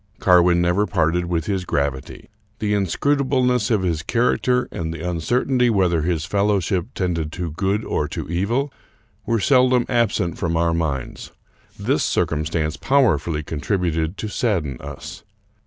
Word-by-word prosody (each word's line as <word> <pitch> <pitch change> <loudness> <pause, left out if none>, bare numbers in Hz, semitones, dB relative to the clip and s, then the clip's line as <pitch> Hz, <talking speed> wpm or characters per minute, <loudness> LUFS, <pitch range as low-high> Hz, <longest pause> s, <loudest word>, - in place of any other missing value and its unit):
Carwin 90 -1 +5
never 90 +4 +2
parted 85 -1 +1
with 85 -2 -1
his 95 -3 -1
gravity. 70 -5 -3 0.3
The 105 -1 -1
inscrutable 130 - +1
ness 125 -2 +1
of 105 -5 +1
his 85 -4 0
character, 125 +5 +1
and 80 -1 -4
the 80 +1 -5
uncertainty 120 - +1
whether 90 -6 +2
his 80 -1 -1
fel 100 +2 +1
lowship 95 -3 0
tended 85 -4 -2
to 85 -3 -4
good 100 +7 -1
or 75 - -1
to 75 - -5
evil, 115 - -1 0.5
were 115 -1 +1
seldom 125 +1 +4
absent 110 -8 0
from 85 -2 0
our 85 0 +2
minds. 75 -6 -3 0.5
This - - 0
circumstance 80 0 -1
powerfully 120 - +1
contributed 80 +2 -2
to 110 - -4
sadden 90 - -1
us. 75 +6 -8
90 Hz, 145 wpm, -21 LUFS, 80-110 Hz, 0.5 s, Carwin